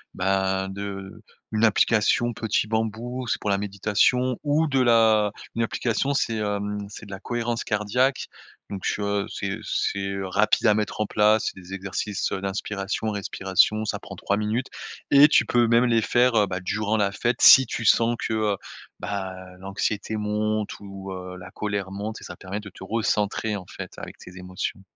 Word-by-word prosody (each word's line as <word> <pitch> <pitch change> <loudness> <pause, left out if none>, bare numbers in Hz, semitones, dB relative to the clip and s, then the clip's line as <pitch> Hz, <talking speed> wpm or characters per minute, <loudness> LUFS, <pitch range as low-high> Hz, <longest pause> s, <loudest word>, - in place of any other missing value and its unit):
ben, 95 0 0
de 95 0 -7 0.3
une 110 +1 +1
application 115 +2 +3
Petit 110 -1 0
Bambou. 115 +3 -2
C'est - - 0
pour 105 - -2
la 100 - +2
méditation 105 +5 +1
ou 150 +2 +2
de 135 -2 +1
la 110 -3 +4 0.2
une 115 - 0
application, 115 +4 0
c'est, 115 -4 0
hem, 105 -1 -2
c'est 105 - -10
de 100 - -11
la 95 - -6
cohérence 120 +1 -2
cardiaque 125 +6 0 0.5
donc 95 -2 -5
heu, 100 0 0
c'est 100 +1 -3
c'est 100 0 -1
rapide 105 +5 +2
à 105 - +6
mettre 105 0 -2
en - - +2
place. 105 +1 +3
C'est - - -13
des 90 +2 -10
exercices, 100 +1 -3
heu, - - -2
d'inspiration, 100 +2 -3
respiration. 100 +1 +1
Ça 110 - -2
prend - - -10
3 100 - -1
minutes 110 +5 -1 0.4
et 140 +1 +9
tu 150 - +4
peux 120 -1 +3
même 115 +1 +4
les 115 -2 +3
faire, 120 +2 +3
heu, 105 - +5
bah, 90 -1 -4
durant 105 +3 -1
la 100 -2 +1
fête 120 +4 -1
si 130 - +10
tu 115 - -4
sens 115 +3 +4
que, 110 - -3
heu, 110 -2 +1 0.5
ben, 100 -1 -3 0.3
heu, - - -18
l'anxiété 100 +2 -2
monte 105 0 -1
ou 100 -1 -8
heu, 90 0 -7
la 90 +1 -11
colère 100 -1 -3
monte 105 +3 -5
et - - -11
ça - - -9
permet 100 +2 -5
de 100 - -10
te 95 - -12
recentrer, 105 0 0
en 95 - -9
fait, 95 0 -8
avec - - -8
tes 90 0 -13
émotions. 90 +1 -5
105 Hz, 185 wpm, -25 LUFS, 100-115 Hz, 0.5 s, si